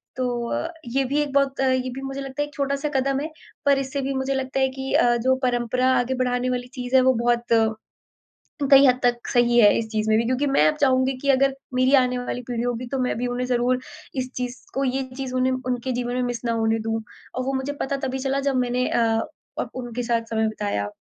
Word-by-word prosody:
तो 245 Hz, -2 st, -2 dB
अ, 330 Hz, -, -3 dB, 0.2 s
ये 270 Hz, +3 st, +1 dB
भी 285 Hz, +3 st, +1 dB
एक 290 Hz, -2 st, -2 dB
बहुत 275 Hz, -1 st, +2 dB
ये 260 Hz, -1 st, +1 dB
भी 270 Hz, -, -6 dB
मुझे 270 Hz, 0 st, -5 dB
लगता 270 Hz, +1 st, -4 dB
है 290 Hz, -, 0 dB
एक 295 Hz, -, -17 dB
छोटा-सा 280 Hz, +1 st, -1 dB
कदम 270 Hz, +1 st, +1 dB
है। 315 Hz, -, -4 dB, 0.4 s
पर 280 Hz, -1 st, +5 dB
इससे 275 Hz, +1 st, -3 dB
भी 270 Hz, +1 st, -2 dB
मुझे 265 Hz, +1 st, -1 dB
लगता 265 Hz, 0 st, -2 dB
है 265 Hz, -, +4 dB
कि 265 Hz, 0 st, -4 dB
अ, 240 Hz, 0 st, +4 dB
जो 260 Hz, +3 st, +2 dB
परंपरा 250 Hz, +1 st, +1 dB
आगे 250 Hz, +2 st, 0 dB
बढ़ाने 250 Hz, 0 st, 0 dB
वाली 250 Hz, 0 st, -2 dB
चीज़ 250 Hz, +1 st, -2 dB
है 260 Hz, -, +7 dB
वो 260 Hz, 0 st, +4 dB
बहुत 240 Hz, 0 st, +2 dB, 1.3 s
कई 275 Hz, 0 st, +8 dB
हद 250 Hz, 0 st, +4 dB
तक 240 Hz, -1 st, +1 dB
सही 240 Hz, 0 st, +3 dB
है 205 Hz, -3 st, +7 dB
इस 225 Hz, -, -3 dB
चीज़ 215 Hz, 0 st, -1 dB
में 215 Hz, -, +5 dB
भी 230 Hz, -, +1 dB
क्योंकि 255 Hz, +3 st, 0 dB
मैं 215 Hz, -, +4 dB
अब -, -, 0 dB
चाहूँगी 260 Hz, -1 st, +3 dB
कि 280 Hz, -, -2 dB
अगर 270 Hz, 0 st, +3 dB, 0.2 s
मेरी 255 Hz, +2 st, +3 dB
आने 250 Hz, 0 st, -1 dB
वाली 245 Hz, 0 st, -4 dB
पीढ़ी 235 Hz, -1 st, -2 dB
होगी 245 Hz, 0 st, -2 dB
तो 270 Hz, -, 0 dB
मैं 250 Hz, -, -1 dB
भी 245 Hz, -, -1 dB
उन्हें 245 Hz, +1 st, -2 dB
ज़रूर 250 Hz, +1 st, +1 dB, 0.4 s
इस 255 Hz, -1 st, -2 dB
चीज़ 250 Hz, 0 st, -3 dB, 0.2 s
को 275 Hz, +1 st, 0 dB
ये 265 Hz, +1 st, 0 dB
चीज़ 265 Hz, -2 st, -4 dB
उन्हें 255 Hz, 0 st, +2 dB
उनके 250 Hz, 0 st, -1 dB
जीवन 245 Hz, 0 st, -2 dB
में 250 Hz, -, 0 dB
मिस 245 Hz, -1 st, -3 dB
ना 235 Hz, -, +1 dB
होने 225 Hz, 0 st, +1 dB
दूँ। 225 Hz, 0 st, -2 dB, 0.3 s
और 255 Hz, -, -2 dB
वो 270 Hz, +1 st, -1 dB
मुझे 265 Hz, +2 st, -2 dB
पता 275 Hz, +1 st, -1 dB
तभी 265 Hz, +1 st, -3 dB
चला 270 Hz, +1 st, -1 dB
जब 265 Hz, -, -1 dB
मैंने 250 Hz, 0 st, +1 dB
अ 235 Hz, -, +1 dB, 0.6 s
अब -, -, -4 dB
उनके 245 Hz, -1 st, -4 dB
साथ 230 Hz, -1 st, 0 dB
समय 220 Hz, 0 st, +2 dB
बिताया। 205 Hz, -, -2 dB
255 Hz, 240 wpm, -23 LUFS, 240-270 Hz, 1.3 s, कई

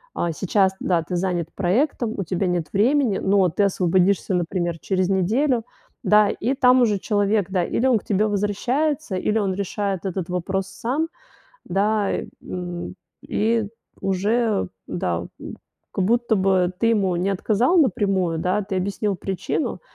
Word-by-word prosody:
а, 170 Hz, -, -1 dB
сейчас 190 Hz, +3 st, +1 dB
да, 175 Hz, -3 st, +1 dB
ты 175 Hz, +3 st, -3 dB
занят 175 Hz, -2 st, -1 dB
проектом, 225 Hz, -, 0 dB
у 195 Hz, -, -1 dB
тебя 185 Hz, +2 st, -1 dB
нет 175 Hz, -3 st, -1 dB
времени, 235 Hz, 0 st, +3 dB
но 195 Hz, -2 st, +3 dB
ты 205 Hz, -, 0 dB
освободишься, 190 Hz, 0 st, +2 dB
например, 175 Hz, -1 st, -1 dB
через 185 Hz, +1 st, 0 dB
неделю, 225 Hz, +7 st, +1 dB, 0.4 s
да. 210 Hz, -1 st, +5 dB
И 255 Hz, +7 st, -1 dB
там 255 Hz, -1 st, +5 dB
уже 215 Hz, -4 st, +3 dB
человек, 205 Hz, -2 st, 0 dB
да, 185 Hz, -2 st, +1 dB
или 245 Hz, -, -1 dB
он 235 Hz, -5 st, +4 dB
к -, -, -20 dB
тебе 210 Hz, +1 st, +1 dB
возвращается, 240 Hz, +7 st, -1 dB
или 210 Hz, +4 st, 0 dB
он 195 Hz, -3 st, 0 dB
решает 200 Hz, 0 st, -3 dB
этот 185 Hz, -2 st, -4 dB
вопрос 185 Hz, +2 st, -2 dB
сам, 265 Hz, +11 st, -2 dB, 0.6 s
да, 205 Hz, +2 st, +1 dB, 0.3 s
м. 175 Hz, -1 st, -6 dB, 0.3 s
И 220 Hz, 0 st, +1 dB, 0.3 s
уже, 200 Hz, -, 0 dB, 0.2 s
да, 85 Hz, -1 st, -2 dB, 0.2 s
м, -, -, -8 dB, 0.3 s
как 190 Hz, -, 0 dB
будто 235 Hz, +1 st, +2 dB
бы 185 Hz, -2 st, +2 dB
ты 230 Hz, -, +2 dB
ему 200 Hz, -5 st, +2 dB
не 185 Hz, +3 st, 0 dB
отказал 220 Hz, -, +2 dB
напрямую, 195 Hz, -, +2 dB
да, 185 Hz, +5 st, 0 dB
ты 195 Hz, 0 st, -4 dB
объяснил 200 Hz, +2 st, -1 dB
причину. 195 Hz, -, -3 dB
195 Hz, 155 wpm, -22 LUFS, 180-220 Hz, 0.6 s, да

